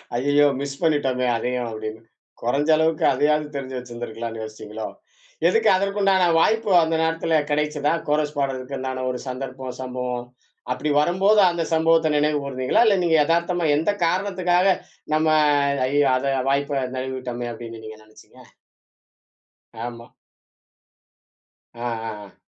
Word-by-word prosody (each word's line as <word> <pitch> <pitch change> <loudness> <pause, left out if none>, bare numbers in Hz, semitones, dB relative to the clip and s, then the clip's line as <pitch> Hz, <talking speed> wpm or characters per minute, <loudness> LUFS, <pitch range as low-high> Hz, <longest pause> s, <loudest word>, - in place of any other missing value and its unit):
ஐயயோ! 145 +4 +3
மிஸ் 140 -1 -5
பண்ணிட்டோமே 135 -6 +1
அதயும். 125 +1 -2
அப்படின்னு. 110 0 -6 0.4
கொரஞ்ச 140 +6 0
அளவுக்கு 160 0 +1
அதையாவது, 150 +3 +1
தெரிஞ்சு 130 -2 -5
வச்சுருந்துக்கலானு 120 -2 -6
யோசிச்சீங்களோ? 110 0 -7 0.6
எதுக்கு, 450 0 +3
அதற்கு 200 +1 -2
உண்டான 190 -2 +4
வாய்ப்பு. 220 +3 +2
அந்த 160 0 0
நேரத்துல 165 0 +1
கிடைச்சதா? 150 0 0 0.2
கோரஸ் 150 0 0
பாட்றதுக்குண்டான, 130 -1 -3
ஒரு 125 - -5
சந்தர்ப்பம்? 130 0 -6
சம்பவம்? 125 -1 -4 0.5
அப்படி 150 - -3
வரம்போது, 195 +6 +3
அந்த 170 -1 -2
சம்பவத்த 160 0 +3
நினைவு 150 0 +1
கூர்ந்தீங்களா? 130 - +1
இல்ல, 200 -2 +4
நீங்க 165 -2 +3
எதார்த்தமா. 170 +1 +1
எந்த 160 +7 +1
காரணத்துக்காக 185 0 +1 0.5
நம்ம, 155 +1 +2 0.6
ஐயயோ! 145 +1 +2
அத, 135 +1 -1 0.2
வாய்ப்பை 140 -1 0
நளுவிட்டோமே 130 -2 -4
அப்படினு 115 -1 -8
நீங்க, 110 0 -10
நினைச்சீங்க? 110 - -18 1.4
ஆமா. 120 -1 -8 1.7
ஆ. - - -13 0.3
ஆ. 105 -1 -8
ஆ. 100 - -19
140 Hz, 125 wpm, -23 LUFS, 125-160 Hz, 1.7 s, உண்டான